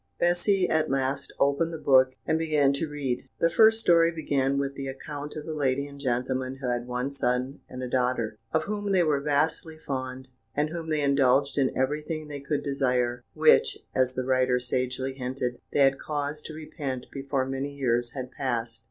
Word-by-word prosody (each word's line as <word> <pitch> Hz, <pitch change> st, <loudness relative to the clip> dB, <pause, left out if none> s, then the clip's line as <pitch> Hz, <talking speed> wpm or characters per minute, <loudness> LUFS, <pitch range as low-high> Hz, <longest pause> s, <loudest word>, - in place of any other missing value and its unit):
Bessy, 180 Hz, +2 st, +3 dB
at 160 Hz, -1 st, +1 dB
last, 135 Hz, +1 st, -1 dB
opened 140 Hz, +4 st, +2 dB
the 165 Hz, -, -4 dB
book 130 Hz, -3 st, +4 dB
and 160 Hz, -, +1 dB
began 150 Hz, -4 st, +3 dB
to 150 Hz, +3 st, -2 dB
read. 135 Hz, -3 st, -3 dB
The 165 Hz, -, +3 dB
first 220 Hz, +4 st, +6 dB
story 170 Hz, -5 st, +5 dB
began 140 Hz, -4 st, 0 dB
with 140 Hz, 0 st, -1 dB
the 135 Hz, -1 st, -5 dB
account 145 Hz, +2 st, -6 dB
of 150 Hz, -1 st, -6 dB
a 160 Hz, -, -3 dB
lady 140 Hz, -2 st, 0 dB
and 140 Hz, 0 st, -11 dB
gentleman 130 Hz, 0 st, -1 dB
who 135 Hz, -1 st, -5 dB
had 120 Hz, 0 st, -2 dB
one 125 Hz, +2 st, -2 dB
son 130 Hz, 0 st, -1 dB
and 130 Hz, 0 st, -6 dB
a -, -, -2 dB
daughter, 125 Hz, -4 st, 0 dB
of 160 Hz, -, +1 dB
whom 205 Hz, 0 st, -2 dB
they 180 Hz, -2 st, +4 dB
were 150 Hz, -3 st, +1 dB
vastly 155 Hz, +3 st, 0 dB
fond, 130 Hz, -3 st, -5 dB, 0.3 s
and 150 Hz, +1 st, 0 dB
whom 165 Hz, -1 st, -5 dB
they 155 Hz, -1 st, +1 dB
indulged 140 Hz, 0 st, +3 dB
in 135 Hz, -2 st, +1 dB
everything 150 Hz, +3 st, -2 dB
they 145 Hz, -1 st, -5 dB
could 140 Hz, +1 st, -2 dB
desire, 125 Hz, -3 st, 0 dB
which 65 Hz, -, +5 dB, 0.2 s
(as 130 Hz, 0 st, +2 dB
the 130 Hz, -, -2 dB
writer 130 Hz, -1 st, +2 dB
sagely 130 Hz, +1 st, -2 dB
hinted) 125 Hz, -1 st, -3 dB
they 145 Hz, -, +2 dB
had 135 Hz, 0 st, +4 dB
cause 150 Hz, 0 st, -3 dB
to 155 Hz, -, -7 dB
repent 145 Hz, -5 st, -5 dB
before 135 Hz, -1 st, -1 dB
many 135 Hz, +2 st, -3 dB
years 120 Hz, -3 st, 0 dB
had 130 Hz, -2 st, -5 dB
passed. 120 Hz, -4 st, -2 dB
140 Hz, 190 wpm, -27 LUFS, 130-150 Hz, 0.3 s, first